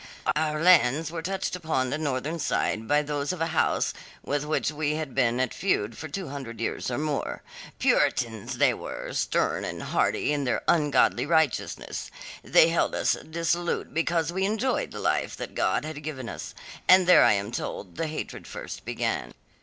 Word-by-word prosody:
"Our 155 0 0
lands 160 -3 +4
were 165 -1 -4
touched 190 +2 -2
upon 155 -7 -1
the 145 - 0
northern 150 +2 -2
side 110 -6 -1
by 150 +1 +3
those 145 0 -2
of 180 - -5
a 165 - +1
house - - +1 0.3
with 145 0 -1
which 155 0 0
we 150 0 -1
had 155 -4 -4
been 125 -2 +2
at 130 - 0
feud 115 - 0
for 155 - -6
two 180 +1 -5
hundred 135 -5 -7
years 115 - -2
and 130 +4 -2
more. 150 -2 -2 0.3
Puritans 115 -3 +1
they - - +4
were, - - -6
stern - - 0
and - - -5
haughty 150 - +1
in 145 -1 -1
their 125 - -1
ungodly 145 -4 +3
righteousness. 160 -5 0 0.3
They 160 - +5
held 165 - +1
us - - +2 0.2
dissolute 170 +1 -1
because 165 0 0
we 190 +1 0
enjoyed 220 +6 0
the - - -9
life - - 0
that - - -6
God - - +1
had 155 -1 -6
given 140 -5 -5
us, - - -7 0.3
and 185 0 +7
there 180 - +7
I - - +6
am 100 +2 -2
told 95 -6 -5
the 165 - -1
hatred 155 0 -6
first - - -7
began. - - -2
150 Hz, 180 wpm, -27 LUFS, 130-165 Hz, 0.3 s, and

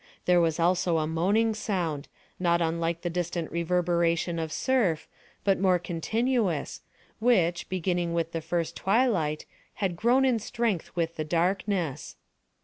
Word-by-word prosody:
There 180 -1 +5
was 165 -1 +1
also 175 0 +2
a 155 - +1
moaning 195 +8 +1
sound, 175 -9 -2 0.3
not 170 -1 +2
unlike 165 0 -1
the 175 - -1
distant 175 -1 -3
reverberation 170 0 +1
of 160 -1 -3
surf, 210 -8 +1 0.4
but 195 -1 +2
more 185 -1 +4
continuous, 190 - -1 0.4
which, 180 -8 +2
beginning 175 -2 -1
with 165 -1 -1
the 165 - -3
first 165 +1 -2
twilight, 190 -9 +1 0.3
had 190 -4 -1
grown 245 +8 +3
in 250 -3 +2
strength 225 -5 -2
with 165 -1 -1
the 155 - -1
darkness. 175 -1 -1
175 Hz, 140 wpm, -27 LUFS, 165-195 Hz, 0.4 s, There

